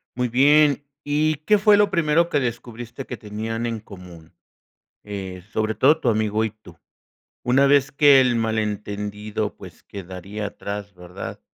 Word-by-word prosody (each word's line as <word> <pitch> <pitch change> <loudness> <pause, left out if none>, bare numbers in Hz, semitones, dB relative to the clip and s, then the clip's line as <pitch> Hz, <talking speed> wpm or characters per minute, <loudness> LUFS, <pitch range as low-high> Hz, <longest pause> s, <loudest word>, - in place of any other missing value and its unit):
Muy 125 0 0
bien, 145 +4 +4 0.2
¿y 150 +2 +1
qué 210 - +5
fue 210 0 +5
lo 205 0 +4
primero 170 -2 +2
que 145 - 0
descubriste 120 +1 -5
que 125 - -6
tenían 110 +1 -5
en 115 -1 -3
común? 90 -5 -13 0.7
Eh, 95 -3 -7
sobre 110 0 -1
todo 150 +4 +4
tu 145 - -3
amigo 110 -1 +1
y 110 - -3
tú. 100 -6 -17 0.7
Una 135 +3 +4
vez 140 -1 +3
que 140 -2 +6
el 125 -2 +2
malentendido, 105 -1 -3
pues, 90 -4 -13
quedaría 100 +2 -7
atrás, 100 0 -6
¿verdad? 90 +1 -8
110 Hz, 150 wpm, -22 LUFS, 105-140 Hz, 0.7 s, que